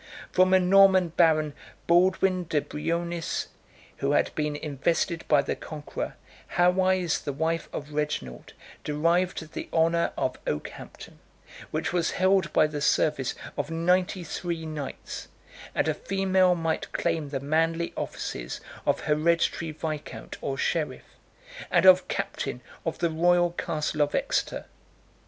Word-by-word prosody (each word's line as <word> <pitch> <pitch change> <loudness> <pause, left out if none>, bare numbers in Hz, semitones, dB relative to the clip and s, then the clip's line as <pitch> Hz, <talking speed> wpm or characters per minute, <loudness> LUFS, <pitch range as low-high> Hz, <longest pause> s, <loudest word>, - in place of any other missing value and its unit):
83 - - -17
From 185 +1 +4
a - - +6
Norman 190 -1 +5
baron, 155 -3 +3 0.3
Baldwin 185 +1 +3
de 155 -2 +1
Brioniis, 170 +3 -3 0.5
who 140 +1 0
had - - +2
been 150 -1 -1
invested 160 +4 -1
by 145 -2 +4
the - - -2
Conqueror, 150 -2 -6 0.4
Hawise, 180 -1 +3
the 145 - -2
wife 160 +3 -1
of 150 0 -6
Reginald, 145 - -3 0.3
derived 165 +2 0
the - - -6
honor 165 +1 +2
of 130 - -1
Okehampton, 75 - -6 0.5
which - - -2
was 175 -2 +1
held 190 0 +3
by - - +4
the 150 -1 -4
service 140 -3 +1 0.2
of 145 0 -3
ninety 180 +2 +1
three 170 0 -4
knights; 150 -3 -6 0.5
and - - +1
a - - +2
female 190 -2 +2
might 165 -1 -2
claim 165 -4 -1
the 140 -1 -2
manly 165 +4 0
offices - - -5 0.3
of - - +2
hereditary 165 +2 +1
viscount 155 -1 -6
or 135 -1 -3
sheriff, 155 +2 -1 0.6
and 175 0 +3
of 185 0 +7
captain - - -3 0.3
of - - -2
the 170 -1 0
royal 175 +2 +3
castle 155 -3 -2
of 145 0 +1
Exeter. - - -1
165 Hz, 135 wpm, -27 LUFS, 150-180 Hz, 0.6 s, of